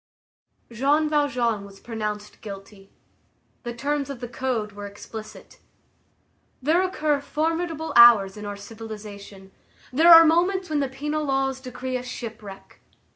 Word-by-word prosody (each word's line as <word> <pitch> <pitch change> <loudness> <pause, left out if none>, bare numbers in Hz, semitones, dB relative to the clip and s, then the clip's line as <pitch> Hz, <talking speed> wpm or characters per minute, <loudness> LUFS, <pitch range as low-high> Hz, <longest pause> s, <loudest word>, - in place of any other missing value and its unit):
Jean 285 +6 +2
Valjean 250 -8 0
was 195 -1 -13
pronounced 210 -2 -6
guilty. 195 -1 -10 0.7
The 240 -2 -6
terms 280 +2 -2
of 275 -3 -6
the 245 - -6
Code 235 -4 -3
were 205 0 -8
explicit. 215 +2 -11 1.0
There 315 +7 +2
occur 305 -6 0
formidable 320 +1 -2
hours 225 -5 +7
in 210 - -9
our 205 -1 -6
civilization; 205 -2 -10 0.4
there 325 +6 +6
are 330 0 +11
moments 360 +2 +1
when 300 - +1
the 275 -2 -1
penal 295 +3 -3
laws 270 -1 -1
decree 255 0 -4
a - - -6
shipwreck. 220 -5 -9
250 Hz, 130 wpm, -24 LUFS, 210-295 Hz, 1.0 s, are